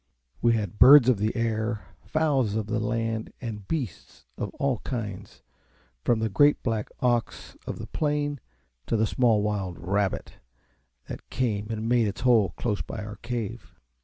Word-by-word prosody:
We 120 - +4
had 105 -3 -2
birds 135 -2 +9
of 120 -6 +3
the 110 +1 0
air, 110 -1 -1 0.2
fowls 140 -9 +1
of 110 -1 -1
the 110 +1 -1
land, 115 0 -2
and 105 -5 -6
beasts 130 - -5
of - - -3
all 135 -5 0
kinds' 105 - -6 0.6
from 120 - +3
the 110 0 0
great 145 +8 +3
black 110 -3 -1
ox 120 -2 -1
of - - -4
the - - -6
plain 145 -2 -1 0.5
to 115 - +1
the 110 - +3
small 115 -3 +2
wild 100 -4 -2
RAB 95 +2 0
BIT - - -8 0.7
that - - -8
came 105 -5 -1
and 110 0 -3
made 120 -2 +3
its 100 +4 -5
hole 120 -6 +3
close 105 -4 -1
by 105 - -6
our 105 0 -8
cave. 120 -2 -5
115 Hz, 165 wpm, -26 LUFS, 105-125 Hz, 0.7 s, birds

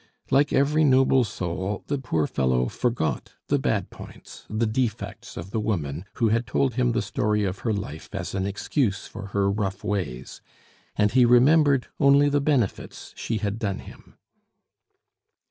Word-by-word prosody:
Like 140 +2 +4
every 150 +3 +3
noble 130 -2 +4
soul, 95 -1 -4
the 145 -1 -2
poor 80 - 0
fellow 65 -3 +1
forgot 120 - -2 0.2
the - - +2
bad - - -1
points, - - -12
the 110 +2 0
defects 115 0 -3
of 85 +4 -7
the 110 - -1
woman 85 -6 -2
who 115 -2 +2
had 115 +2 0
told 130 +4 +1
him 125 0 +1
the - - 0
story 105 0 0
of 95 -1 -2
her 115 - -1
life 85 -7 -5
as 95 -3 -5
an 95 0 -1
excuse 100 +1 -1
for 100 -2 -8
her 100 0 0
rough 100 -1 -3
ways, 75 -12 -4 0.5
and 105 -1 +2
he 125 +1 +5
remembered 135 +3 +5
only 140 0 +5
the 145 0 +1
benefits 140 -8 -1
she 115 - -3
had 105 +1 -3
done 100 -4 -2
him. - - -13
110 Hz, 165 wpm, -25 LUFS, 95-130 Hz, 0.5 s, he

